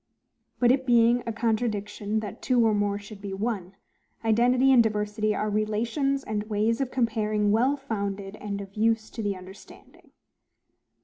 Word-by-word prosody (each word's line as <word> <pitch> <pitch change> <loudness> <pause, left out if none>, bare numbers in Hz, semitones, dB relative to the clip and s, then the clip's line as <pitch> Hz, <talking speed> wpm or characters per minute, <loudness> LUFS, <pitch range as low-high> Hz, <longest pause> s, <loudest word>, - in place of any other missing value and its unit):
But 245 -1 +4
it 265 0 0
being 240 0 +4
a - - 0
contradiction 215 -1 -1
that 210 -2 -7
two 245 -3 +3
or 220 - +3
more 205 -1 0
should 205 0 -11
be 195 -1 -5
one, 195 -3 -3 0.5
identity 245 +4 +4
and 255 -3 +7
diversity 215 -1 0
are 215 - -1
relations 230 +7 0
and 215 -1 -2
ways 220 +4 +1
of 265 - -1
comparing 215 -4 0
well 255 +7 +2
founded, 200 -6 -4
and 200 -1 -5
of 195 0 -10
use 220 +1 0
to 225 - -5
the 205 -2 -1
understanding. 190 +1 -14
215 Hz, 160 wpm, -26 LUFS, 205-235 Hz, 0.5 s, and